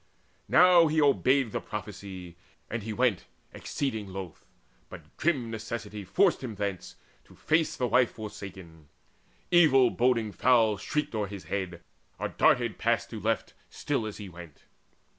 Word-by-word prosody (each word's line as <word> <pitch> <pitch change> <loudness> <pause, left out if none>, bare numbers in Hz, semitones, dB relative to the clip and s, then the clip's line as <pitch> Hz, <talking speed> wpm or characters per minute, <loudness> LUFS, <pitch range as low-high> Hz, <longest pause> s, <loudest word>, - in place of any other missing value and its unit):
Now 175 -1 +6
he 155 +1 +1
obeyed 135 -4 +3
The - - -3
prophecy, 95 -4 -8 0.4
and 115 - -2
he 110 +2 -5
went 115 -3 +1 0.3
exceeding 110 -8 -3
loth, 95 -3 -8 0.5
But - - -13
grim 135 -8 0
necessity 110 -2 -6
forced 180 - +2
him 115 -4 -5
thence, 100 -3 -4 0.3
to - - -18
face 160 0 +1
The 125 - 0
wife 125 +1 +3
forsaken. 95 -7 -10 0.6
Evil 140 -8 +5
boding 120 -3 +1
fowl 115 -3 +3
Shrieked 150 +9 -3
o'er 105 -2 -1
his 100 -1 -8
head, 90 -3 -4 0.4
or - - -3
darted - - +2
past - - 0
to - - -5
left, - - -1 0.2
Still 135 -7 -2
as 105 - -7
he 105 - -8
went. 85 -4 -13
110 Hz, 145 wpm, -28 LUFS, 100-130 Hz, 0.6 s, Now